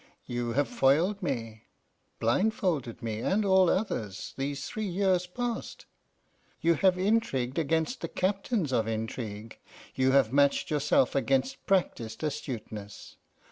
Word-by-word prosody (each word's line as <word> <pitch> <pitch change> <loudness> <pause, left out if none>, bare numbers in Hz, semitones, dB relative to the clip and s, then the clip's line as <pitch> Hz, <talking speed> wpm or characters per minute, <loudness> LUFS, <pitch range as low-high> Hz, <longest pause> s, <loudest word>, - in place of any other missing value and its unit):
You 120 -1 -2
have 145 +2 +2
foiled 170 +10 +2
me, 115 - -4 0.5
blindfolded 140 - 0
me 110 -2 -3
and 200 - +1
all 190 -2 +5
others, 110 - -2
these 140 +1 -3
three 215 -1 -4
years 185 -1 +1
past. 240 +5 -4 0.7
You 170 +1 +3
have 185 +3 +3
intrigued 180 - +1
against 160 - 0
the - - -2
captains 195 - -1
of 110 -3 +1
intrigue, 110 -1 -5 0.3
you 130 0 +2
have 135 -3 +3
matched 140 +1 +3
yourself 145 -3 +2
against 135 -1 0
practised 160 - 0
astuteness. 115 -9 -6
140 Hz, 125 wpm, -29 LUFS, 120-185 Hz, 0.7 s, all